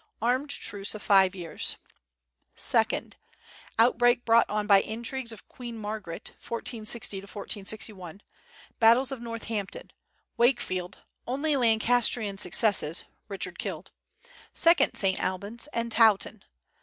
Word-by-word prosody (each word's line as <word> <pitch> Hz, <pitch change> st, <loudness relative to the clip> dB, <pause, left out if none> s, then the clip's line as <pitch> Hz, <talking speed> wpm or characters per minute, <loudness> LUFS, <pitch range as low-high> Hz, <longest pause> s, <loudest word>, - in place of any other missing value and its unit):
Armed 255 Hz, +6 st, 0 dB
truce 205 Hz, -6 st, -3 dB
of 210 Hz, -, -8 dB
five 195 Hz, -1 st, +4 dB
years. 170 Hz, -4 st, -3 dB, 0.8 s
Second -, -, 0 dB, 0.6 s
Outbreak 245 Hz, +1 st, +3 dB
brought 230 Hz, 0 st, +4 dB
on 210 Hz, 0 st, -1 dB
by 200 Hz, -2 st, +6 dB
intrigues 235 Hz, +2 st, -4 dB
of 225 Hz, -, -11 dB
Queen 240 Hz, -2 st, -8 dB
Margaret, 210 Hz, -5 st, -6 dB
1460 230 Hz, -2 st, -3 dB
1461; 200 Hz, -2 st, -4 dB, 0.6 s
battles 235 Hz, +4 st, +5 dB
of 265 Hz, -3 st, -6 dB
Northampton, 225 Hz, -3 st, -5 dB, 0.5 s
Wakefield 235 Hz, -8 st, 0 dB, 0.3 s
(only 285 Hz, +4 st, 0 dB
Lancastrian 225 Hz, -3 st, +2 dB
success; 180 Hz, -4 st, +1 dB, 0.2 s
Richard 185 Hz, -3 st, -6 dB
killed), -, -, -5 dB, 0.6 s
second 335 Hz, +1 st, +5 dB
St. 190 Hz, -1 st, +1 dB
Albans, 200 Hz, +8 st, -2 dB
and 235 Hz, 0 st, -2 dB
Towton. 220 Hz, -2 st, +3 dB
220 Hz, 105 wpm, -27 LUFS, 195-235 Hz, 0.8 s, by